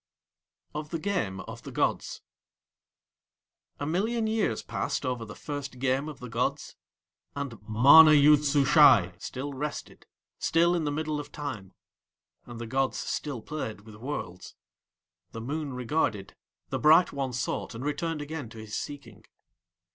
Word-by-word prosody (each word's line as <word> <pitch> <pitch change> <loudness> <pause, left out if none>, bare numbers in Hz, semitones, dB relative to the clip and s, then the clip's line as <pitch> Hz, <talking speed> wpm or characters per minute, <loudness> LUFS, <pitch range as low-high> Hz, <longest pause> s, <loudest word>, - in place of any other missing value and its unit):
OF 150 0 -5
THE 165 - -2
GAME 155 - -2
OF - - -9
THE - - -9
GODS - - -1 1.6
A 145 - -3
million 220 +9 0
years 220 - 0
passed - - -3
over 125 -3 -2
the 105 - -10
first 145 -3 -6
game 135 +3 0
of 150 - -10
the 125 - -8
gods. 115 +1 -2 0.6
And 135 -7 -5
MANA 140 +8 +8
YOOD 150 0 +6
SUSHAI 145 - +5
still 140 +3 -5
rested, 145 +2 -6 0.3
still 170 +1 +3
in 170 -3 0
the 145 - 0
middle 155 0 -2
of 145 0 -8
Time, 115 -12 -6 0.7
and 120 -1 -9
the 120 - -5
gods 130 +3 0
still 135 -7 -4
played 110 -9 -5
with 110 0 -14
Worlds. 105 -6 -6 0.8
The 115 - -6
Moon 145 +2 -4
regarded, 115 -6 -1
and - - -30 0.4
the - - -1
Bright 160 +4 +5
One 135 -2 -2
sought, 125 -1 -3
and 125 +4 -6
returned 150 +1 -2
again 145 -5 -6
to 115 - -13
his 110 -1 -7
seeking. 145 -1 -7
140 Hz, 150 wpm, -28 LUFS, 120-150 Hz, 1.6 s, MANA